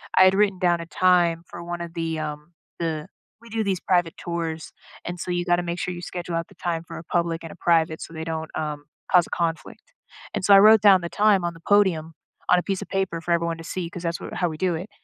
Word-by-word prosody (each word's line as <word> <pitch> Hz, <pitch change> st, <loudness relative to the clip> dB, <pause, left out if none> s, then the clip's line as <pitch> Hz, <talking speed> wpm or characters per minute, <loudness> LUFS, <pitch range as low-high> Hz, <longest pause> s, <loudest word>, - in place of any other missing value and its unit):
I 185 Hz, -, +8 dB
had 185 Hz, 0 st, +5 dB
written 200 Hz, -2 st, +2 dB
down 175 Hz, -1 st, +2 dB
a 170 Hz, -, -6 dB
time 175 Hz, -1 st, +3 dB
for 170 Hz, -, -9 dB
one 175 Hz, 0 st, -5 dB
of 170 Hz, -1 st, -7 dB
the, 165 Hz, -1 st, -2 dB
um 150 Hz, +2 st, -6 dB, 0.3 s
the 160 Hz, -1 st, -2 dB, 0.3 s
we 235 Hz, -, -15 dB
do 225 Hz, 0 st, -1 dB
these 195 Hz, -3 st, -1 dB
private 175 Hz, -3 st, +1 dB
tours, 165 Hz, -2 st, -4 dB, 0.3 s
and 175 Hz, 0 st, -6 dB
so 180 Hz, -, -4 dB
you 175 Hz, 0 st, 0 dB
gotta 175 Hz, -1 st, +2 dB
make 175 Hz, 0 st, -3 dB
sure 180 Hz, -, -2 dB
you 175 Hz, -, -7 dB
schedule 175 Hz, -1 st, -5 dB
out 165 Hz, 0 st, -2 dB
the -, -, -18 dB
time 165 Hz, -2 st, -3 dB
for -, -, -8 dB
a -, -, -10 dB
public 170 Hz, 0 st, -1 dB
and 165 Hz, -, -8 dB
a -, -, -11 dB
private 160 Hz, -2 st, +2 dB
so -, -, -9 dB
they 160 Hz, 0 st, -5 dB
don't, 160 Hz, -1 st, -4 dB
um, 150 Hz, -2 st, -3 dB, 0.3 s
cause 180 Hz, -2 st, +6 dB
a -, -, -17 dB
conflict. 165 Hz, -1 st, -3 dB, 0.5 s
And -, -, -2 dB
so 200 Hz, -, +6 dB
I 195 Hz, -, +10 dB
wrote 215 Hz, +1 st, +7 dB
down 195 Hz, -3 st, +6 dB
the 170 Hz, -, -4 dB
time 205 Hz, -2 st, +3 dB
on 170 Hz, -1 st, -2 dB
the -, -, -13 dB
podium 180 Hz, -6 st, +3 dB, 0.4 s
on 180 Hz, -, +6 dB
a -, -, -4 dB
piece 195 Hz, -2 st, -2 dB
of -, -, -13 dB
paper 190 Hz, -3 st, -1 dB
for 170 Hz, +1 st, -4 dB
everyone 170 Hz, -1 st, +1 dB
to 165 Hz, -, -9 dB
see 170 Hz, +1 st, -4 dB
'cause 175 Hz, 0 st, -8 dB
that's 170 Hz, 0 st, -2 dB
what -, -, -7 dB
how 180 Hz, -, +1 dB
we 155 Hz, -, -7 dB
do 180 Hz, 0 st, 0 dB
it. 180 Hz, +6 st, -6 dB
170 Hz, 265 wpm, -24 LUFS, 165-185 Hz, 0.5 s, I